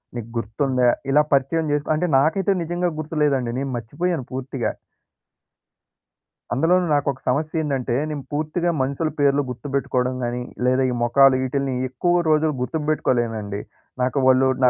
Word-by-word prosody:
నీకు 115 Hz, -1 st, -6 dB
గుర్తుందా? 125 Hz, +2 st, +1 dB, 0.2 s
ఇలా 150 Hz, +2 st, +5 dB
పరిచయం 140 Hz, +4 st, +2 dB
జేసుకొని, 150 Hz, +1 st, 0 dB
అంటే 175 Hz, +1 st, 0 dB
నాకైతే 170 Hz, +7 st, +2 dB
నిజంగా 175 Hz, +1 st, -1 dB
గుర్తులేదండి. 150 Hz, -6 st, 0 dB
నేను 135 Hz, -1 st, -3 dB
మర్చిపోయాను 145 Hz, +5 st, -2 dB
పూర్తిగా. 130 Hz, -1 st, -2 dB, 1.8 s
అందులోనూ 175 Hz, +6 st, +3 dB
నాకొక 140 Hz, -2 st, 0 dB
సమస్యేందంటే, 140 Hz, -3 st, -1 dB
నేను 145 Hz, -3 st, -4 dB
పూర్తిగా 155 Hz, +4 st, -1 dB
మనుషుల 140 Hz, +4 st, -1 dB
పేర్లు 145 Hz, 0 st, +3 dB
గుర్తుబెట్టుకోవడం 130 Hz, -1 st, -1 dB
గాని, 120 Hz, +1 st, -2 dB, 0.2 s
లేదా 130 Hz, +1 st, +3 dB
ఈ -, -, -1 dB
మొఖాలు, 135 Hz, +2 st, +5 dB
ఈటిల్ని 135 Hz, 0 st, -1 dB, 0.2 s
ఎక్కువ 175 Hz, +8 st, +1 dB
రోజులు 155 Hz, 0 st, +3 dB
గుర్తుబెట్టుకోలేనండి. 120 Hz, -8 st, -1 dB, 0.4 s
నాకు 130 Hz, +3 st, -1 dB
వాళ్ళు 130 Hz, 0 st, +5 dB, 0.2 s
నా 125 Hz, -, +7 dB
140 Hz, 125 wpm, -22 LUFS, 125-155 Hz, 1.8 s, నా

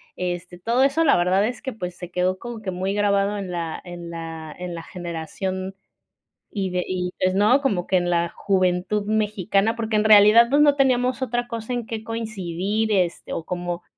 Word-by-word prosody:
este, 175 Hz, 0 st, -4 dB
todo 235 Hz, +7 st, +2 dB
eso 280 Hz, +4 st, +3 dB
la 280 Hz, -, +5 dB
verdad 185 Hz, +4 st, +2 dB
es 245 Hz, +3 st, -6 dB
que, 265 Hz, -3 st, -4 dB
pues, 180 Hz, -4 st, -6 dB
se 175 Hz, -1 st, -8 dB
quedó 180 Hz, +1 st, 0 dB
como 240 Hz, 0 st, -7 dB
que 195 Hz, -, -4 dB
muy 190 Hz, +2 st, -2 dB
grabado 205 Hz, 0 st, +1 dB
en 195 Hz, -2 st, -5 dB
la 170 Hz, -2 st, -4 dB
en 175 Hz, -1 st, -8 dB
la 165 Hz, -2 st, -7 dB
en 180 Hz, -1 st, -5 dB
la 165 Hz, -, -7 dB
generación. 185 Hz, +2 st, -5 dB, 0.8 s
Y 190 Hz, -1 st, 0 dB
de 180 Hz, 0 st, -2 dB
y 180 Hz, -1 st, -2 dB
pues 185 Hz, 0 st, +2 dB
no, 215 Hz, +7 st, +4 dB
como 195 Hz, -10 st, 0 dB
que 190 Hz, -, +2 dB
en 175 Hz, 0 st, 0 dB
la 170 Hz, -1 st, +1 dB
juventud 190 Hz, +1 st, 0 dB
mexicana, 215 Hz, 0 st, +1 dB
porque, 225 Hz, -2 st, -1 dB
en 210 Hz, -, +1 dB
realidad 215 Hz, +2 st, +7 dB
pues 290 Hz, +2 st, +4 dB
no 290 Hz, -1 st, +5 dB
teníamos 255 Hz, -1 st, +2 dB
otra 240 Hz, -1 st, -1 dB
cosa 230 Hz, +1 st, -4 dB
en 240 Hz, -2 st, -2 dB
qué 225 Hz, -1 st, -5 dB
coincidir, 215 Hz, -1 st, -2 dB
este, 180 Hz, -3 st, -1 dB
o 165 Hz, -, -3 dB
como 175 Hz, 0 st, -4 dB
195 Hz, 200 wpm, -23 LUFS, 180-225 Hz, 0.8 s, realidad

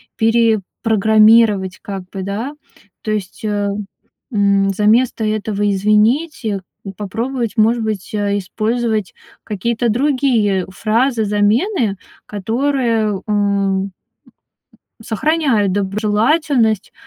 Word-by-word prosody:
перепрограммировать 220 Hz, -2 st, +3 dB
как 195 Hz, -2 st, -6 dB
бы, 190 Hz, -1 st, -6 dB
да? 215 Hz, +9 st, -4 dB, 0.5 s
То 215 Hz, -, -3 dB
есть, 205 Hz, -2 st, -4 dB
э, 205 Hz, -1 st, -1 dB, 0.7 s
м. 200 Hz, -1 st, +2 dB
Заместо 220 Hz, +4 st, +2 dB
этого 215 Hz, -1 st, -1 dB
"извините" 215 Hz, -, +1 dB, 0.3 s
попробовать, 230 Hz, +3 st, -3 dB
может 225 Hz, +2 st, +3 dB
быть, 215 Hz, -3 st, -4 dB
а, 205 Hz, -1 st, 0 dB
использовать 220 Hz, +1 st, -2 dB, 0.3 s
какие-то 235 Hz, +3 st, -1 dB
другие 240 Hz, -7 st, +1 dB
фразы-замены, 220 Hz, -, +1 dB, 0.3 s
которые, 225 Hz, -1 st, -1 dB
м, 200 Hz, -2 st, 0 dB, 1.1 s
сохраняют 230 Hz, -, +1 dB
доброжелательность, 215 Hz, -, +1 dB
215 Hz, 80 wpm, -17 LUFS, 200-235 Hz, 1.1 s, перепрограммировать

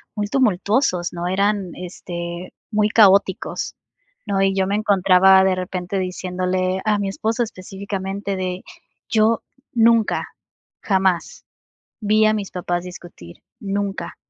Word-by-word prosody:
muy 205 Hz, -1 st, -2 dB
tumultuosos, 205 Hz, -4 st, +1 dB
¿no? 175 Hz, 0 st, -3 dB
Eran, 195 Hz, 0 st, 0 dB
este, 175 Hz, -1 st, -7 dB, 0.2 s
muy 210 Hz, -1 st, +2 dB
caóticos, 200 Hz, -3 st, +3 dB, 0.5 s
¿no? 195 Hz, -1 st, 0 dB
Y 195 Hz, 0 st, +2 dB
yo 190 Hz, -1 st, +2 dB
me 200 Hz, -, 0 dB
encontraba 190 Hz, -2 st, +5 dB
de 190 Hz, -1 st, +2 dB
repente 185 Hz, +1 st, -3 dB
diciéndole 185 Hz, 0 st, -2 dB
a 210 Hz, -1 st, +2 dB
mi 200 Hz, -1 st, -1 dB
esposo 225 Hz, +4 st, -1 dB
específicamente 195 Hz, -1 st, -5 dB
de: 185 Hz, 0 st, -3 dB, 0.5 s
"Yo 220 Hz, +1 st, +2 dB, 0.3 s
nunca, 230 Hz, -2 st, +3 dB, 0.6 s
jamás 190 Hz, -3 st, 0 dB, 0.6 s
vi 215 Hz, +1 st, +3 dB
a 215 Hz, -, +4 dB
mis 205 Hz, -2 st, -4 dB
papás 175 Hz, -1 st, -2 dB
discutir, 175 Hz, -, -12 dB, 0.2 s
nunca". 200 Hz, -1 st, -3 dB
195 Hz, 120 wpm, -21 LUFS, 185-210 Hz, 0.6 s, encontraba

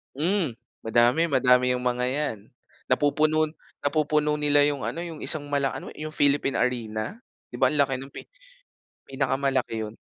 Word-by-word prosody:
Hmm, 165 Hz, -, 0 dB, 0.3 s
madami 120 Hz, +8 st, +3 dB
madami 125 Hz, -4 st, +3 dB
yung 125 Hz, -, -2 dB
mga 125 Hz, 0 st, 0 dB
'yan, 130 Hz, -3 st, -1 dB, 0.5 s
napupuno 155 Hz, +3 st, +2 dB, 0.3 s
napupuno 150 Hz, 0 st, +1 dB
nila 145 Hz, -1 st, +3 dB
yung 145 Hz, -1 st, +1 dB
ano 170 Hz, -, -3 dB
yung 165 Hz, -3 st, -6 dB
isang 145 Hz, -3 st, +1 dB
mala 140 Hz, -1 st, 0 dB
ano -, -, -7 dB
yung 155 Hz, 0 st, -6 dB
Philippine 145 Hz, -2 st, +2 dB
Arena? 115 Hz, -, -2 dB, 0.3 s
'Di -, -, -8 dB
ba -, -, +3 dB
ang 145 Hz, -, +3 dB
laki 135 Hz, -2 st, +1 dB, 0.2 s
pi -, -, -7 dB, 0.8 s
pinakamalaki 135 Hz, -4 st, -1 dB
'yon? 110 Hz, +1 st, -8 dB
140 Hz, 150 wpm, -25 LUFS, 125-150 Hz, 0.8 s, madami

